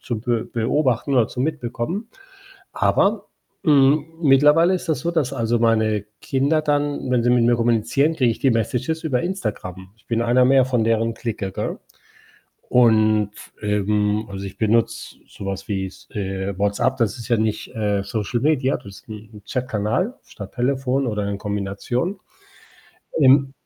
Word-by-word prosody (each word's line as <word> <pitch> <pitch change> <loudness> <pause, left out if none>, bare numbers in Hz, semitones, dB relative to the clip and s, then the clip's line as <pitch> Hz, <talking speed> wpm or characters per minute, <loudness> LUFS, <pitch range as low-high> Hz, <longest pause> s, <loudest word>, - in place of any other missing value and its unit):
zu 120 -4 -4
be 120 -1 -1
beobachten 130 +2 0
oder 120 -4 +3
zum 125 - -2
Mitbekommen. 155 - -3 0.7
Aber, - - +2 0.4
hm, 145 -1 +4 0.2
mittlerweile 150 +5 +5
ist 185 - -4
das 155 - 0
so, 170 - -1
dass 160 -7 0
also, 115 0 0
meine 110 -2 +2 0.2
Kinder 140 +3 +1
dann, 145 -3 -1
wenn 125 -2 +2
sie 120 - +2
mit 120 -1 +4
mir 120 +1 +4
kommunizieren, 120 +6 +1
kriege 130 -6 +2
ich 115 - -4
die 135 - +2
Messages 125 +7 -1
über 130 -6 0
Instagram. 105 - -4
Ich 110 - -30
bin 115 -1 0
einer 120 +2 +3
mehr 130 0 +4
von 125 -4 +1
deren 115 0 +1
Clique, 110 -4 -4
gell? - - -4 0.9
Und, 110 -3 +4 0.3
ähm 105 +1 0
also, 100 0 -6
ich 95 - -8
benutze 115 +1 0
so 100 - -9
was 95 -1 -5
wie 95 -2 -1
s 95 - -14
äh, 95 -1 -4
WhatsApp, 100 +6 +1
das 115 -4 0
ist 115 - -8
ja 120 - +3
nicht, 110 +2 -2
äh, 105 -2 0
Social 110 +3 -2
Media. 140 -1 +2
Das 120 - -16
ist 100 +3 -14
'n 110 0 -9
'n 105 -1 -13
Chatkanal 125 - -1
statt 100 -2 -11
Telefon 135 +1 0
oder 105 -3 -2
in 100 -1 -3
Kombination 105 - -3 1.0
im 135 -1 +5
120 Hz, 165 wpm, -22 LUFS, 105-135 Hz, 1.0 s, mittlerweile